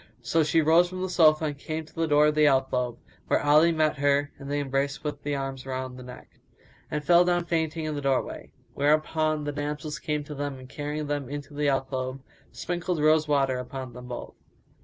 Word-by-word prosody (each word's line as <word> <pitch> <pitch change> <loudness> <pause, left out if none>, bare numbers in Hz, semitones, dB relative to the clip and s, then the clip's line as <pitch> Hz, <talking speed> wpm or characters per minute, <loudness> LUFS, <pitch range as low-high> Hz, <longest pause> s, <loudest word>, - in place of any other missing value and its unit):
So 165 - +2
she 160 +1 +3
rose 165 +3 +5
from 185 0 -5
the 185 - -2
sofa 155 -2 +5
and 145 -2 -3
came 155 +1 -4
to 155 - -20
the 165 0 -1
door 150 0 +5
of 150 - +3
the 150 0 +4
alcove, 130 -3 +1 0.3
where - - +3
Ali 150 +3 +5
met 155 -2 +1
her 145 0 +2
and 140 -1 -8
they 145 0 0
embraced 140 0 -1
with 150 -1 -4
arms 135 -2 -3
round 130 -1 -4
the - - -9
neck, 125 0 -13 0.5
and 150 -1 -3
fell 175 +3 +6
down 175 -1 +1
fainting 160 -1 -1
in 155 - -2
the 145 - -4
doorway; 135 -2 -1 0.2
whereupon 155 +1 +1
the 145 - -2
damsels 150 +1 -4
came 150 -2 -2
to 150 - -8
them 145 -1 -4
and 130 0 -12
carrying 150 +2 -4
them 145 -3 -3
into 145 +1 -7
the 145 0 +1
alcove, 130 -1 -2 0.3
sprinkled 175 0 -3
rose 155 +1 +4
water 135 -3 +2
upon 130 -1 -7
them 125 0 -10
both. 120 -1 -7
145 Hz, 205 wpm, -27 LUFS, 135-155 Hz, 0.5 s, fell